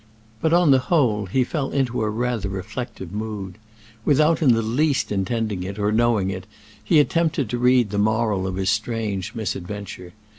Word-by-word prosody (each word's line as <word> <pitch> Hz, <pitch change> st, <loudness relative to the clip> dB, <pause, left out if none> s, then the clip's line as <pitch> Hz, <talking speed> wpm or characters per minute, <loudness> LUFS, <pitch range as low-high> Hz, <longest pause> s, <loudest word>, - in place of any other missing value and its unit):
But 160 Hz, -, +1 dB
on 170 Hz, -3 st, +5 dB
the 135 Hz, -, +6 dB
whole 115 Hz, -, +2 dB
he 130 Hz, +8 st, +2 dB
fell 140 Hz, +1 st, -3 dB
into 130 Hz, -4 st, -1 dB
a 110 Hz, -, 0 dB
rather 115 Hz, -2 st, -2 dB
reflective 95 Hz, 0 st, -6 dB
mood. 105 Hz, -2 st, -5 dB, 0.4 s
Without 155 Hz, +4 st, +3 dB
in 135 Hz, -6 st, +5 dB
the 115 Hz, 0 st, +1 dB
least 140 Hz, +6 st, 0 dB
intending 105 Hz, 0 st, -1 dB
it 95 Hz, +2 st, -5 dB
or 105 Hz, 0 st, 0 dB
knowing 110 Hz, -4 st, +2 dB
it, 95 Hz, -1 st, -7 dB, 0.4 s
he 160 Hz, -, +4 dB
attempted 150 Hz, -5 st, +1 dB
to 120 Hz, -, -2 dB
read 125 Hz, -3 st, +3 dB
the 100 Hz, -, -1 dB
moral 110 Hz, -2 st, +1 dB
of 95 Hz, -, -3 dB
his 95 Hz, 0 st, +1 dB
strange 110 Hz, -4 st, -2 dB
misadventure. 100 Hz, -3 st, -5 dB
110 Hz, 175 wpm, -22 LUFS, 100-125 Hz, 0.4 s, the